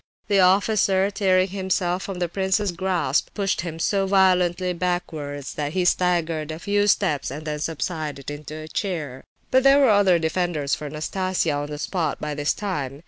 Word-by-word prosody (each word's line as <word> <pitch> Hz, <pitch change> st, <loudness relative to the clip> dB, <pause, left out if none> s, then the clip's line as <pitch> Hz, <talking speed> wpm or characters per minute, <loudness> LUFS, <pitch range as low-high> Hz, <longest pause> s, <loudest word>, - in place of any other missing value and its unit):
The 200 Hz, -1 st, +4 dB
officer, 195 Hz, +1 st, +3 dB
tearing 190 Hz, -2 st, +2 dB
himself 185 Hz, -1 st, -1 dB
from 195 Hz, -2 st, -5 dB
the 175 Hz, -1 st, -1 dB
prince's 190 Hz, +2 st, 0 dB
grasp, 175 Hz, -5 st, 0 dB
pushed 195 Hz, -4 st, 0 dB
him 165 Hz, -2 st, -6 dB
so 195 Hz, +3 st, 0 dB
violently 185 Hz, -2 st, +3 dB
backwards 160 Hz, -6 st, -3 dB
that 150 Hz, 0 st, -3 dB
he 185 Hz, -1 st, 0 dB
staggered 170 Hz, -4 st, +1 dB
a 155 Hz, -, -4 dB
few 205 Hz, +3 st, 0 dB
steps 150 Hz, -7 st, +1 dB
and 150 Hz, +4 st, -7 dB
then 150 Hz, -1 st, -3 dB
subsided 155 Hz, -3 st, -4 dB
into 150 Hz, +1 st, -8 dB
a 155 Hz, 0 st, -8 dB
chair. 160 Hz, -, -4 dB, 0.3 s
But 260 Hz, -, +5 dB
there 275 Hz, +1 st, +6 dB
were 275 Hz, -5 st, +5 dB
other 200 Hz, -4 st, +4 dB
defenders 160 Hz, -3 st, -1 dB
for 150 Hz, -, -3 dB
Nastasia 175 Hz, +3 st, -1 dB
on 145 Hz, 0 st, -3 dB
the 150 Hz, -, -5 dB
spot 160 Hz, -1 st, -2 dB
by 150 Hz, 0 st, -3 dB
this 145 Hz, 0 st, -1 dB
time. 145 Hz, -10 st, -4 dB
175 Hz, 175 wpm, -23 LUFS, 150-190 Hz, 0.3 s, there